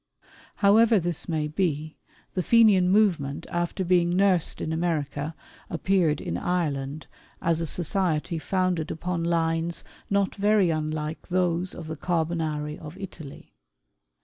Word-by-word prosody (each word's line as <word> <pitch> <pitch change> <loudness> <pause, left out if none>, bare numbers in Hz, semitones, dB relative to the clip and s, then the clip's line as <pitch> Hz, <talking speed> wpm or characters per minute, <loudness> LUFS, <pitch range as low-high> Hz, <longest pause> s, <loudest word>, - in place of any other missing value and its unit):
However 220 +2 +5
this 175 0 -3
may 155 -2 0
be, 155 -1 -2 0.4
the 185 - 0
Fenian 205 -4 +5
movement 175 -9 +2
after 175 +2 -1
being 175 -1 +3
nursed 190 -4 +2
in 160 - -2
America, 160 -2 -2 0.3
appeared 170 -3 +1
in 85 +1 -3
Ireland, 150 -4 -2 0.3
as 165 -1 0
a 165 - -1
society 170 -2 0
founded 185 -2 0
upon 170 +1 -3
lines 165 0 0 0.3
not 200 -1 +1
very 205 -3 +3
unlike 155 0 -3
those 180 0 0
of 170 - -7
the 160 0 -5
Carbonari 160 -3 -2
of 155 +2 -10
Italy. 165 -7 -10
170 Hz, 125 wpm, -26 LUFS, 155-185 Hz, 0.4 s, However